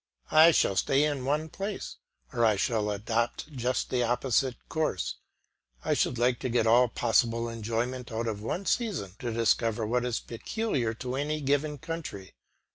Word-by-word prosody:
I 160 +2 +8
shall 100 - +3
stay 135 +8 +3
in 145 -4 -1
one 150 +3 0
place, 195 +5 -5 0.4
or 120 - +1
I 110 -2 +5
shall 105 +1 0
adopt 115 +7 -2
just 125 -1 -1
the 125 - +1
opposite 125 +1 +1
course; 155 - -1 0.7
I - - +2
should 125 - +1
like 120 +1 +2
to 130 - -2
get 120 -1 +2
all 120 +3 +5
possible 115 0 +1
enjoyment 115 +3 -3
out 115 +1 -2
of 110 -3 -3
one 175 - -3
season 195 - -1
to 120 -2 -3
discover 115 0 +1
what 120 +3 0
is 125 -2 -1
peculiar 120 - -2
to 125 +2 -4
any 150 +2 -1
given 145 +1 0
country. 140 - -6
120 Hz, 165 wpm, -28 LUFS, 115-145 Hz, 0.7 s, I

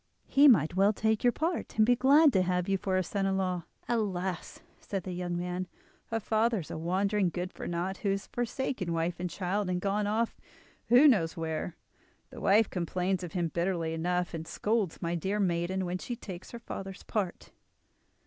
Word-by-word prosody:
He 285 +1 +6
might 175 - +5
well 200 +3 +4
take 220 +1 0
your 245 - +5
part, 330 +1 -2
and 215 - +6
be 245 +2 +4
glad 280 +3 +6
to 190 - +4
have 180 -1 0
you 195 - +2
for 190 0 0
his 185 - 0
son 195 +1 -1
in 190 0 +1
law." 180 -3 -1 0.2
"Alas!" 190 -6 -2 0.2
said 195 -3 -4
the 185 - -5
young 175 -1 -3
man, 180 +1 -3 0.4
"her 225 - -1
father 220 0 +1
is 155 - -10
a - - -4
wandering 190 +3 +1
good 180 +1 -4
for - - -6
naught, 175 +3 -2
who 200 - -2
has 195 +1 -1
forsaken 240 -6 -2
wife 165 +1 -1
and 180 0 -2
child, 190 +2 -2
and 180 -1 0
gone 205 +2 0
off—who 235 +4 +1
knows 175 - +3
where? 160 +1 -3 0.6
The - - -9
wife 210 +2 +5
complains 180 +1 -1
of 175 - -6
him 175 -3 0
bitterly 170 -1 -1
enough, 180 +2 -1
and 165 0 -5
scolds 210 -6 -1
my 170 0 -1
dear 190 +5 -1
maiden 185 0 0
when 180 +1 -3
she 240 - -4
takes 185 -6 -9
her 235 - -7
father's 195 -4 -7
part." 200 -5 -3
190 Hz, 195 wpm, -30 LUFS, 175-215 Hz, 0.6 s, He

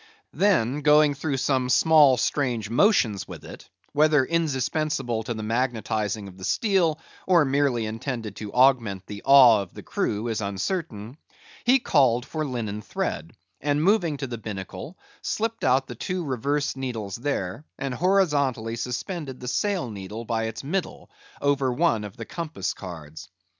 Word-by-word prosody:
Then 150 - +2
going 150 0 +5
through 140 0 -2
some 130 -1 0
small 150 -2 +6
strange 120 -4 -1
motions 120 - +3
with - - -10
it—whether 150 -2 0
indispensable 150 -5 -1
to 115 +1 -4
the 110 - -5
magnetizing 110 -3 -1
of 95 0 -13
the - - -10
steel, 175 - +1 0.3
or 175 -5 +5
merely 135 -4 +1
intended 115 -1 -5
to 105 -2 -6
augment 120 -7 +3
the 100 -1 -8
awe 130 -6 +7
of 95 - -10
the - - -9
crew, 105 +3 -2
is 115 -1 -2
uncertain—he 120 - -2
called 130 - +2
for 155 +1 -3
linen 115 -7 -4
thread; 80 -5 -4 0.3
and 145 +1 +1
moving 175 -6 +2
to 140 - -4
the 120 -3 -6
binnacle, 100 - -7 0.2
slipped 225 +1 -2
out 130 +1 +3
the 125 - -8
two 180 - -3
reversed 140 +3 -1
needles 115 -7 -4
there, 120 -4 -3
and 135 -2 -3
horizontally 140 - +1
suspended 130 - -4
the 125 - -8
sail 185 - -1
needle 105 +3 -7
by 115 -1 -1
its 110 +3 -5
middle, 180 +5 -4 0.3
over 140 -2 +2
one 115 -3 +1
of 105 +2 -9
the 115 - -6
compass 165 -2 -4
cards. 80 -4 -9
130 Hz, 150 wpm, -25 LUFS, 110-150 Hz, 0.3 s, awe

